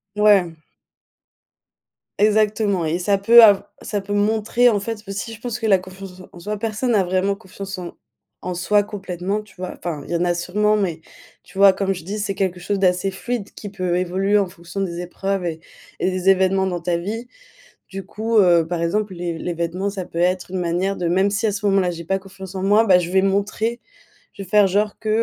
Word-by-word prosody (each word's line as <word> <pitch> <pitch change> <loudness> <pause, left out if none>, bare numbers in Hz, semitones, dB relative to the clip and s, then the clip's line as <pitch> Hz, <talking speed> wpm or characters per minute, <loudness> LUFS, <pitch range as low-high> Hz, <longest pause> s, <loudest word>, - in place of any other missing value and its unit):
Ouais. 205 -5 +4 1.6
Exactement 210 -3 +2
et 160 +2 0
ça 195 +3 +1
peut 230 +4 +8
av 205 -2 +6
ça 205 - -3
peut 200 +1 -5
montrer 220 +4 +2
en 210 -3 +1
fait 215 +1 -5
aussi 200 +3 -5
je 225 - -12
pense 245 -1 -4
que 225 - -4
la 195 -3 +5
confiance 185 0 -11
en - - -11
s - - -14
en 175 - -13
soi, 210 +4 -4
personne 225 +3 -1
a 200 - +3
vraiment 185 +2 0
confiance 195 0 -8
en 180 -2 -7 0.5
en 180 - -4
soi 205 +4 +2
complètement 195 -1 -4
tu 210 -2 -20
vois? 185 0 -5
Enfin 160 -4 -5
il - - -10
y - - 0
en 170 - +1
a 175 0 +2
sûrement, 210 +5 +1
mais 175 -6 -2 0.4
tu - - -16
vois 195 -1 +7
comme 195 0 -1
je 175 -3 -9
dis: 200 +3 -4
«C'est 200 -1 -2
quelque 185 -2 -1
chose 200 +3 -2
d'assez 185 0 +1
fluide 225 +2 -4
qui 205 - -8
peut 185 -3 -1
évoluer 190 +3 +1
en 200 -2 +1
fonction 175 +2 -9
des 175 -3 -3
épreuves 195 +2 -3
et 165 -2 -3 0.4
et - - +1
des 185 0 0
événements 190 0 +3
dans 180 -2 -2
ta 170 +1 -1
vie.» 220 +7 -5 0.6
Du 195 0 -7
coup, 220 +4 -2
heu, 175 -4 +5
par 170 -1 -3
exemple 205 +4 -1
les 170 -1 -4
les 175 - -4
vêtements 170 +4 -2
ça 195 -2 -5
peut 170 - -9
être 180 +1 0
une 185 0 -3
manière 180 +3 -1
de: 175 - -2
«Même 190 +3 +2
si 200 +2 -1
à 215 - +2
ce 200 +1 -5
moment-là 195 -2 +2
j'ai 170 -1 -7
pas 195 +3 0
confiance 195 0 -11
en 190 - -3
moi, 205 +3 +4
bah, 190 -4 +6
je 175 -1 -2
vais 190 0 +4
me 195 - +2
montrer, 215 +4 -1 0.5
je - - -9
vais 190 - -9
faire 210 0 +5
genre 205 +2 0
que, 220 - -4
195 Hz, 230 wpm, -21 LUFS, 180-205 Hz, 1.6 s, peut